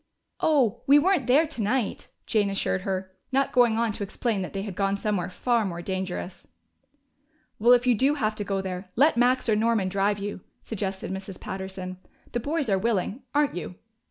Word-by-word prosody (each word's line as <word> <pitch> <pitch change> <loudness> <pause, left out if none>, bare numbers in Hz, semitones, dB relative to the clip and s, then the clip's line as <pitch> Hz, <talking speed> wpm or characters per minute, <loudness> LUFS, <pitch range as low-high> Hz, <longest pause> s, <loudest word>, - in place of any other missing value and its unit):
"Oh, 260 -8 +2
we 280 +2 +8
weren't 330 -3 +2
there 280 +6 +5
tonight," 245 -5 -2 0.2
Jane 205 -2 +1
assured 195 -1 -1
her, 190 0 -3 0.2
not 270 +1 +2
going 240 -3 +4
on 230 -1 +1
to 205 - -6
explain 205 +1 -1
that 185 - -4
they 195 -1 -4
had 200 -3 -6
gone 195 0 0
somewhere 200 -4 -1
far 235 +4 +1
more 175 -3 -4
dangerous. 185 -1 -4 1.1
"Well, 240 +3 +6
if 245 0 +4
you 250 - +5
do 270 +6 +2
have 220 -6 0
to 205 - -2
go 195 -1 -1
there, 185 0 -5
let 290 +6 +4
Max 250 +2 +3
or 220 - +4
Norman 220 -3 +2
drive 200 +2 +1
you," 205 -1 -5 0.2
suggested 195 -3 -4
Mrs. 190 0 -6
Patterson. 190 -1 -6 0.3
"The 240 - -1
boys 290 +3 -1
are 195 -3 +2
willing, 220 +2 -1
aren't 295 -1 +3
you?" 180 0 -5
210 Hz, 185 wpm, -26 LUFS, 190-245 Hz, 1.1 s, we